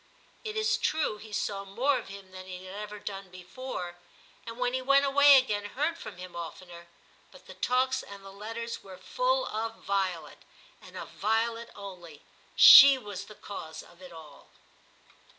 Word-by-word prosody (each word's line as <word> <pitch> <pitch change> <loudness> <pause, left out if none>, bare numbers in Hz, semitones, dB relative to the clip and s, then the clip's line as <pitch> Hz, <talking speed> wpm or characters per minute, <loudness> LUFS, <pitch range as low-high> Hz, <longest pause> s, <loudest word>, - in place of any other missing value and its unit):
It 435 -1 -5
is 435 0 +1
true, 305 -9 0
he 215 0 -12
saw 200 -1 -3
more 250 +8 0
of - - -11
him 195 -1 -11
than 185 0 -10
he 185 0 -9
had 185 - -9
ever 210 +1 -7
done 195 -2 -7
before, 180 0 -7 0.5
and 230 0 -7
when 250 0 -1
he 260 - -1
went 275 +2 +4
away 280 0 +7
again, 210 -6 0
heard 295 +10 -2
from 335 - -10
him 180 0 -10
oftener; 170 0 -9 0.4
but - - -17
the - - -11
talks 260 +1 0
and 200 -1 -12
the 195 - -10
letters 225 +3 -6
were 190 -1 -11
full - - 0
of 225 +1 -5
Violet, 185 -5 -2 0.4
and - - -13
of - - -7
Violet 230 +2 -1
only; 175 -6 -11 0.3
she 275 -1 +10
was 205 -5 -8
the 215 - -13
cause 160 -7 -9
of 175 - -20
it 180 -1 -12
all. 155 -4 -14
205 Hz, 175 wpm, -28 LUFS, 185-255 Hz, 0.5 s, she